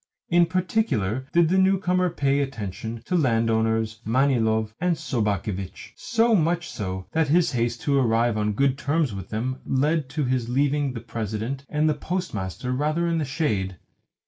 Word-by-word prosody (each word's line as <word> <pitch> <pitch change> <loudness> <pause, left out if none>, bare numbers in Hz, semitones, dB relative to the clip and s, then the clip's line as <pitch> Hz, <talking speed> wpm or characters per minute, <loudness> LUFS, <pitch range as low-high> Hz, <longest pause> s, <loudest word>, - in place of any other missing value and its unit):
In 175 0 +4
particular 150 - 0
did 170 -2 +4
the 190 +2 +3
newcomer 185 -1 +2
pay 140 -4 +1
attention 115 -3 -4
to 180 - -1
landowners 115 -5 +1
Manilov 110 -3 +1
and 180 -1 +2
Sobakevitch; 105 - -3
so 230 -1 +2
much 175 -2 +2
so 95 -3 -4
that 160 -1 +1
his 170 +4 +3
haste 120 -2 -1
to 140 -1 +2
arrive 115 -2 +2
on 105 0 0
good 135 +4 +1
terms 145 -5 0
with 95 -2 -7
them 125 +4 -3
led 145 +1 0
to 150 +2 -2
his 125 -2 -1
leaving 140 +1 +1
the 115 - -6
President 115 +4 -4
and 150 +1 +1
the 155 - +3
Postmaster 130 - -4
rather 155 +6 0
in 165 -1 +1
the 155 - -1
shade. 105 - -1
130 Hz, 160 wpm, -24 LUFS, 110-160 Hz, -, In